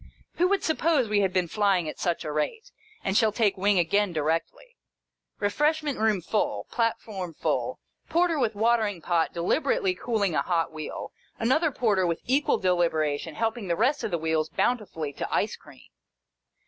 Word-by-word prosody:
Who 360 - +4
would 400 +1 +1
suppose 315 -5 +2
we 210 -1 +2
had 190 -2 +1
been 185 -2 +1
flying 195 -3 +1
at - - -6
such 175 -2 -1
a 150 - -3
rate, 445 - -3 0.3
and 195 - -1
shall 220 0 +4
take 210 -2 +1
wing 200 +1 +2
again 200 +3 +2
directly 165 - -2 0.6
1 205 - +1
Eefreshment 300 0 0
room 215 -4 +2
full, 280 - -1
platform 210 -7 -2
full, - - -1 0.3
porter 335 -1 +2
with 220 -5 0
watering 220 -3 +1
pot 165 0 0
deliberately 185 - +1
cooling 200 -2 -1
a - - +2
hot 170 -2 0
wheel, 155 -1 -6 0.3
another 285 +8 +2
porter 205 -8 +1
with 170 -1 -2
equal 285 +3 +2
deliberation 165 -4 0
helping 225 -2 -2
the 170 - +1
rest 260 - +1
of - - -1
the 175 - 0
wheels 160 -1 0
bountifully 180 -11 -1
to - - -5
ice - - 0
cream. - - -18
205 Hz, 170 wpm, -26 LUFS, 170-245 Hz, 0.6 s, Who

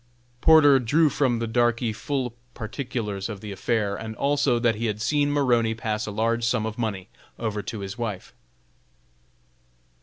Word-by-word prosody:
Porter 145 -4 +7
drew 150 +6 +3
from 130 -4 +1
the 115 0 -2
darkey 120 0 +1
full 125 +1 -3 0.2
particulars 110 -4 -4
of 105 -3 -6
the 105 0 -7
affair, 100 +1 -1
and 110 +1 -6
also 140 -2 +2
that 115 -1 +2
he 115 +2 -2
had 105 -1 -2
seen 145 +5 +1
Maroney 120 -6 +2
pass 110 -1 -3
a - - -3
large 115 +3 0
sum 115 -1 +1
of 110 -1 -4
money 100 -5 -3 0.3
over 110 -3 -2
to 110 0 -6
his 100 +4 -6
wife. 105 -6 -4
115 Hz, 160 wpm, -25 LUFS, 110-125 Hz, 0.3 s, Porter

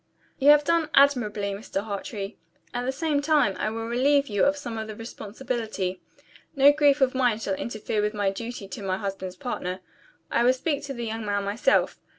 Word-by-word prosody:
"You 280 +1 +5
have 295 0 +7
done 330 0 +1
admirably, 215 -8 +3
Mr. 200 0 -4
Hartrey. 200 0 -5 0.4
At 245 0 -2
the - - +1
same 290 +1 0
time, 290 -10 +3
I - - 0
will 225 +1 -4
relieve 275 +4 +2
you 205 -2 +2
of 285 +1 +2
some 240 -6 -5
of 220 - -5
the 215 - -7
responsibility. 220 -4 -4 0.5
No 280 +1 +7
grief 290 -1 +3
of 260 -1 +3
mine 250 -4 +2
shall 205 -3 -2
interfere 215 +1 -2
with 210 +1 -1
my 200 -2 +1
duty 230 0 -6
to 190 +1 -8
my 190 -1 -1
husband's 195 -2 -5
partner. 185 -5 -4 0.5
I - - +2
will 250 +1 +5
speak 285 +2 -2
to 275 -1 -6
the 240 -1 -4
young 225 0 -4
man 205 -1 -1
myself. 200 +3 +1
225 Hz, 195 wpm, -26 LUFS, 205-275 Hz, 0.5 s, have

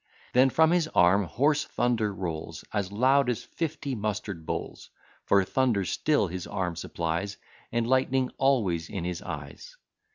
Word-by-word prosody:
Then 130 +2 +6
from 160 +4 +4
his 175 -2 +2
arm 95 +3 +5
hoarse 145 - +2
thunder 115 -4 0
rolls, 85 -5 -5
As 100 -3 -1
loud 130 +5 +3
as 120 - -2
fifty 155 -4 -4
mustard 105 -6 -4
bowls; - - -5 0.4
For 100 -1 +4
thunder 115 -2 +1
still 150 +6 +1
his 90 0 -5
arm 90 -4 -2
supplies, 85 +4 -3 0.3
And 115 0 0
lightning 130 0 +2
always 105 -12 +1
in 95 - -4
his 90 0 -3
eyes. - - -8
105 Hz, 150 wpm, -27 LUFS, 90-130 Hz, 0.4 s, Then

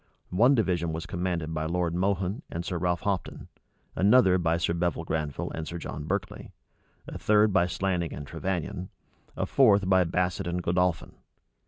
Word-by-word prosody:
One 120 +10 +5
division 85 -8 0
was 80 +1 -4
commanded 85 -3 -3
by 80 0 -2
Lord 85 0 -1
Mohun 95 - -1
and 85 +1 -5
Sir 90 -2 -3
Ralph 90 0 0
Hopton, 100 -3 -3 0.5
another 95 -2 +5
by 85 -1 +1
Sir 85 0 0
Bevil 85 -1 -1
Granville 75 -3 -3
and 80 -1 -5
Sir 85 - -5
John 75 -3 -6
Berkeley, 95 +3 -4 0.6
a - - -7
third 105 -1 +3
by 90 -2 +3
Slanning 90 -2 -1
and 75 - -7
Trevannion, 95 +3 -4 0.5
a - - 0
fourth 100 -8 +4
by 95 -1 +5
Basset 90 +1 -1
and 90 +1 -2
Godolphin. 90 0 0
90 Hz, 165 wpm, -27 LUFS, 85-95 Hz, 0.6 s, One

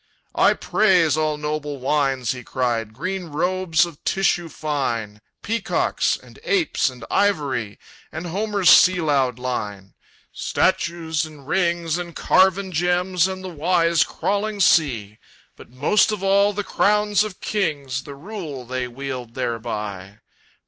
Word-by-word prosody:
"I - - +4
praise 180 -8 +3
all 155 -1 0
noble 150 -1 -3
wines!" 135 -1 0
he 125 -2 -6
cried, 120 -4 -2
"Green 185 +10 -4
robes 170 +2 +1
of 170 -4 -12
tissue 180 -3 +1
fine, 120 -9 -3 0.2
Peacocks 225 -1 0
and - - -17
apes 375 - +1
and 125 -3 -10
ivory, 145 - 0 0.3
And 160 +3 -6
Homer's 200 +1 +2
sea 185 0 +6
loud 135 -6 +1
line, 105 -6 -5 0.4
"Statues 165 -2 0
and 150 -4 -11
rings 170 -2 0
and 170 -2 -7
carven 190 +1 +3
gems, 180 +1 +1
And 190 0 -6
the 185 - -5
wise 170 0 +2
crawling 205 +1 -2
sea; 120 - +2 0.4
But - - -15
most 145 - +2
of 210 -2 -4
all 200 +1 +4
the 205 0 -3
crowns 210 +1 +2
of 210 -4 -7
kings, 145 -10 -2
The 140 0 -10
rule 155 - -7
they 125 +1 -3
wield 125 -2 -6
thereby! 105 -5 -4
155 Hz, 135 wpm, -22 LUFS, 130-185 Hz, 0.4 s, sea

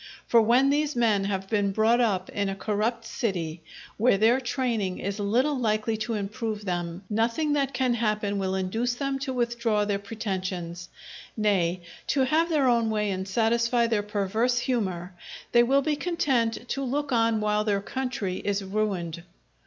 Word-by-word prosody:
For 235 - +5
when 250 +5 +4
these 300 0 0
men 220 -5 +2
have 195 -1 -2
been 205 -1 +1
brought 225 +4 +3
up 195 -6 +1
in 200 -1 -1
a 195 - -3
corrupt 215 +4 -1
city, 175 -10 -3 0.4
where 225 -1 +4
their 230 +5 +4
training 235 -7 -1
is 200 +2 -4
little 245 +9 +1
likely 220 -1 0
to 220 +1 -2
improve 210 +1 -4
them, 175 0 -3
nothing 230 +8 0
that 275 -2 +1
can 255 -2 +2
happen 210 -3 0
will 190 -1 -1
induce 225 +6 -1
them 275 +1 -2
to 270 -1 -3
withdraw 235 -4 0
their 200 -1 -1
pretensions; 185 -4 -4 0.5
nay, 185 -5 +1 0.3
to 275 - +2
have 315 +6 +2
their 295 -5 +2
own 235 -2 +3
way 210 -2 0
and 190 0 -3
satisfy 235 +3 +2
their 225 -3 +1
perverse 210 +4 0
humour, 190 -8 -1 0.4
they 240 - +6
will 270 +3 +3
be 305 0 +1
content 260 -9 0
to 275 - -2
look 280 +2 -2
on 230 -2 +2
while 210 0 +1
their 205 -2 +1
country 210 -4 -3
is 200 0 -1
ruined. 190 -5 -2
220 Hz, 170 wpm, -26 LUFS, 200-245 Hz, 0.5 s, they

